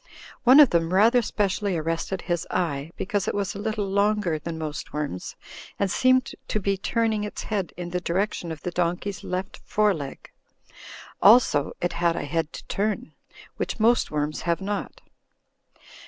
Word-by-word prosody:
One 260 +4 +8
of 290 -5 +8
them 170 +1 +1
rather 230 +5 +5
specially 200 -3 -1
arrested 165 +4 -2
his 175 -2 -2
eye, 160 -5 -1
because 200 0 -1
it - - -1
was 200 -1 -1
a 200 - -7
little 215 -1 -2
longer 200 -4 +1
than 165 +1 -5
most 155 -2 -5
worms 145 -12 -4 0.4
and 200 -2 0
seemed 255 +1 +3 0.2
to 215 - -1
be 195 0 0
turning 220 +2 0
its 210 - -5
head 200 -5 -2
in 175 -1 -5
the 180 0 -1
direction 175 -1 -1
of 155 -3 -8
the 180 - -2
donkey's 175 +3 -2
left 185 +2 -4
foreleg. 190 -10 -1 0.9
Also, 205 - +5
it 175 -1 0
had 170 0 +1
a - - -3
head 160 +2 -1
to - - -9
turn, 215 +5 -2 0.4
which - - -3
most 235 +2 +3
worms 150 0 -2
have 170 0 0
not. 200 +1 -4
190 Hz, 165 wpm, -25 LUFS, 165-210 Hz, 0.9 s, One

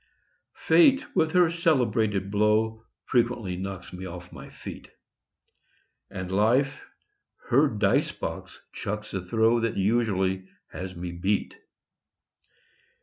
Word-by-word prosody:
Fate 280 -4 +4
with 160 -1 +2
her 180 -2 +4
celebrated 110 - +1
blow 110 +2 +1 0.2
Frequently 120 -6 0
knocks 95 0 -6
me 95 +1 -6
off 90 0 -9
my - - -10
feet; - - -10 1.2
And 95 -2 -6
Life 125 +8 +2 0.7
her 140 +5 +5
dice 105 -5 +1
box - - -6
chucks 105 +1 -5
a 95 - -2
throw 110 +5 +2
That 115 -1 -1
usually 95 -3 +1 0.2
has 95 0 -6
me 85 +1 -5
beat. 95 +4 -1
105 Hz, 110 wpm, -26 LUFS, 95-120 Hz, 1.2 s, her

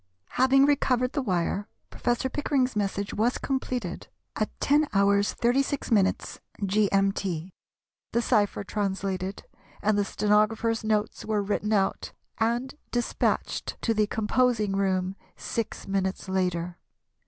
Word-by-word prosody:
Having 265 +2 +4
recovered 255 -3 +2
the 285 - 0
wire, 190 -1 -1 0.2
Professor 240 +2 0
Pickering's 265 -3 0
message 200 -1 -1
was 230 +4 +1
completed 250 -8 -3 0.3
at 215 - 0
10h. 295 +2 +3
36m. 205 +2 +1 0.3
[G.M.T.], 195 -3 +1 0.6
the 235 - +2
cypher 205 -4 +2
translated, 195 -2 -2 0.4
and 210 0 +2
the - - +3
stenographer's 215 +3 +1
notes 215 -1 0
were 215 -2 0
written 210 +1 -1
out 195 -2 0 0.3
and 235 +4 0 0.2
despatched 240 -1 -1
to 230 - +2
the 210 -1 +2
composing 215 -1 +1
room 190 -1 0 0.2
six 230 -2 -4
minutes 195 0 -1
later. 180 -2 -1
210 Hz, 110 wpm, -27 LUFS, 195-240 Hz, 0.6 s, Having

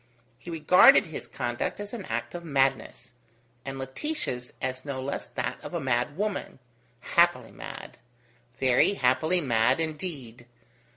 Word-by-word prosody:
He - - -10
regarded 165 +2 +6
his 160 - -7
conduct 120 +8 -3
as 205 +2 -7
an 215 -6 -6
act - - -4
of 175 -1 -6
madness, 135 -4 -1 0.5
and 135 0 -6
Laetitia's 130 - -4
as 130 0 -4
no 140 -2 -4
less 135 +2 -4
that - - -4
of - - -6
a - - 0
madwoman 145 - -2 0.4
happily 170 +6 +2
mad! - - -9 0.6
Very 130 +9 +3
happily 155 +6 +2
mad 115 -1 +2
indeed! 150 -8 -5
140 Hz, 130 wpm, -27 LUFS, 130-175 Hz, 0.6 s, regarded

